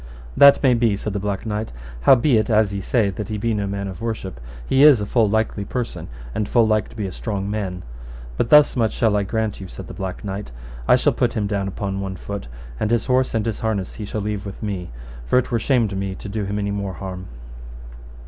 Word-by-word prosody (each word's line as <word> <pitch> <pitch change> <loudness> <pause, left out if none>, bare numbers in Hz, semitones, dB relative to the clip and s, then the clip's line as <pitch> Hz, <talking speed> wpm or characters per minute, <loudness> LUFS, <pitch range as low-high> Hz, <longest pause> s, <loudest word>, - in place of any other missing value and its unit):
That 140 +1 +7
may 130 -2 +5
be, 115 -3 +2
said 105 +1 -4
the 100 - -1
Black 100 +1 -3
Knight; 110 0 -3 0.3
howbeit 120 - +4
as 110 -2 +3
ye 100 - -3
say 105 0 +1
that 105 +3 -6
he 110 - -2
be 115 +2 0
no 100 -2 -1
man 100 0 -3
of 95 +2 -7
worship, 105 - -4 0.3
he 135 - +3
is 145 -5 +8
a 105 - -2
full 110 0 +2
likely 110 -1 0
person, 120 +4 -4 0.3
and 105 - -2
full 120 -2 +4
like 110 -1 +1
to - - -15
be 105 -3 -3
a 95 - -4
strong 100 -1 -3
man: 100 -4 -3 0.5
but 115 - 0
thus 150 -1 +7
much 115 -4 +1
shall 110 -3 +2
I 105 - +2
grant 110 0 -2
you, 95 - -7
said 95 +1 -9
the - - -8
Black 95 +1 -5
Knight; 100 +1 -4 0.4
I - - +7
shall - - +2
put - - +1
him 105 - -1
down 100 -1 -1
upon 100 0 -3
one 95 -1 -4
foot, 100 -3 -6 0.3
and 105 - 0
his 115 -1 +1
horse 130 -1 +1
and 110 -1 0
his 115 -3 -2
harness 105 -4 -2
he 110 - -6
shall 105 +1 -4
leave 105 -1 -3
with 100 +2 -8
me, 95 -4 -3 0.4
for - - +3
it 125 - +1
were 115 - +2
shame 120 -1 +2
to 95 - -5
me 95 0 -3
to - - -8
do 105 0 -3
him 100 +1 -3
any 100 0 -1
more 100 -1 -3
harm. 95 0 -7
105 Hz, 245 wpm, -22 LUFS, 100-115 Hz, 0.5 s, is